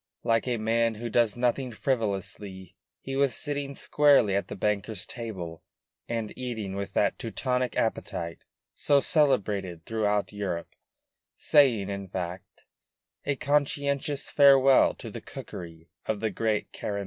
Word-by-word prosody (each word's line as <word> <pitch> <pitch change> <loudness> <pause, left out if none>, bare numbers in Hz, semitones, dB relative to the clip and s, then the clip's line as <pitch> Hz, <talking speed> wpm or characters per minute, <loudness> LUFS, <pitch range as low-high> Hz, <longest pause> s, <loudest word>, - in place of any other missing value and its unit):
Like 115 +1 +2
a 120 -1 0
man 115 +1 +1
who 115 +2 -5
does 115 -1 +2
nothing 125 +1 0
frivolously, 100 -6 -3 0.3
he 135 - -5
was 135 -3 +2
sitting 145 -2 -3
squarely 140 -11 +4
at 100 - 0
the - - -6
banker's 105 -1 -1
table 95 -9 -6 0.5
and 115 -2 -2
eating 110 -6 -4
with 100 0 -4
that 100 - +1
Teutonic 125 +2 -1
appetite 85 -6 -2 0.3
so 145 -1 +3
celebrated 105 - +1
throughout 105 -2 0
Europe, 95 -5 -4 0.6
saying, 120 -9 +3
in 100 -1 -5
fact, 90 0 -6 0.6
a 140 - +1
conscientious 140 0 0
farewell 135 -2 +6
to - - -8
the - - -7
cookery 80 -1 -9 0.2
of 110 -2 -1
the 110 0 -1
great 110 -2 -1
Careme. 100 -1 -3
110 Hz, 135 wpm, -28 LUFS, 100-135 Hz, 0.6 s, farewell